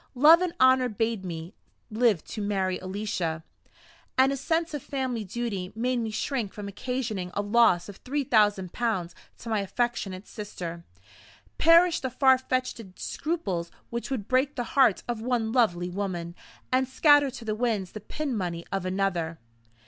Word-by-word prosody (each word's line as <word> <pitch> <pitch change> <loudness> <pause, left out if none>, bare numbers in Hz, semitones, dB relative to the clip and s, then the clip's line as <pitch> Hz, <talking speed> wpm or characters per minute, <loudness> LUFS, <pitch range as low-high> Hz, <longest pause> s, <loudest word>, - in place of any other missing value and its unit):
Love 310 +7 +7
and 365 -2 0
Honor 260 -1 +5
bade 225 -1 -1
me 170 +1 -6 0.4
live 220 -6 +2
to 215 - -6
marry 195 -2 0
Alicia; 185 -4 -3 0.7
and 265 +1 +5
a - - 0
sense 325 +4 -1
of 295 - -3
family 260 -5 -3
duty 200 -3 -4
made 250 +3 0
me 225 -1 -2
shrink 220 -1 -2
from 205 -1 -6
occasioning 220 -3 -3
a 205 - 0
loss 205 -5 +4
of 205 - -10
three 285 +3 -2
thousand 205 -7 +2
pounds 190 -8 -1 0.2
to - - -12
my 220 -2 +1
affectionate 200 -2 -2
sister. 175 -5 -7 0.8
Perish 335 +1 +6
the 260 - -3
far 260 +1 +4
fetched 255 -2 -2 0.2
scruples 195 - -3 0.2
which 235 +3 -4
would 245 -7 -3
break 265 +3 +2
the 245 - -1
heart 255 -8 +4
of 235 -2 -3
one 235 -2 0
lovely 180 -8 +2
woman, 175 -3 -3 0.4
and 260 0 +2
scatter 290 +1 +5
to 245 -2 -9
the 215 - -1
winds 215 -5 -1
the 215 - -7
pin 280 +4 -3
money 175 -4 -3
of 195 -2 -2
another! 185 -4 -1
225 Hz, 165 wpm, -27 LUFS, 190-255 Hz, 0.8 s, Love